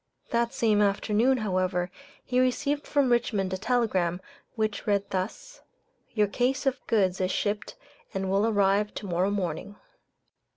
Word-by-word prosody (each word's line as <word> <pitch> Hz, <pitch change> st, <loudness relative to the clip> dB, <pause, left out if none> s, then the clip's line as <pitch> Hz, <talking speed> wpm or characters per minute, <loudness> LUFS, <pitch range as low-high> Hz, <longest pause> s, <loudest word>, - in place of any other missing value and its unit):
That 235 Hz, 0 st, +1 dB
same 215 Hz, -3 st, +2 dB
afternoon, 210 Hz, +5 st, +2 dB
however, 185 Hz, -4 st, -1 dB, 0.3 s
he 250 Hz, 0 st, +1 dB
received 285 Hz, +3 st, 0 dB
from 280 Hz, -4 st, +2 dB
Richmond 210 Hz, -6 st, +1 dB
a -, -, -1 dB
telegram, 200 Hz, -7 st, +1 dB, 0.4 s
which 215 Hz, -2 st, -2 dB
read 200 Hz, -1 st, +1 dB
thus, 195 Hz, -, -4 dB, 0.5 s
"Your 210 Hz, -2 st, +4 dB
case 250 Hz, +7 st, 0 dB
of 270 Hz, -1 st, +1 dB
goods 190 Hz, -4 st, +2 dB
is 185 Hz, -, +1 dB
shipped 205 Hz, +2 st, -2 dB, 0.4 s
and 195 Hz, 0 st, -2 dB
will 195 Hz, +3 st, +2 dB
arrive 205 Hz, -1 st, +2 dB
to -, -, -5 dB
morrow 180 Hz, +1 st, +1 dB
morning." 195 Hz, 0 st, -3 dB
205 Hz, 140 wpm, -27 LUFS, 190-235 Hz, 0.5 s, Your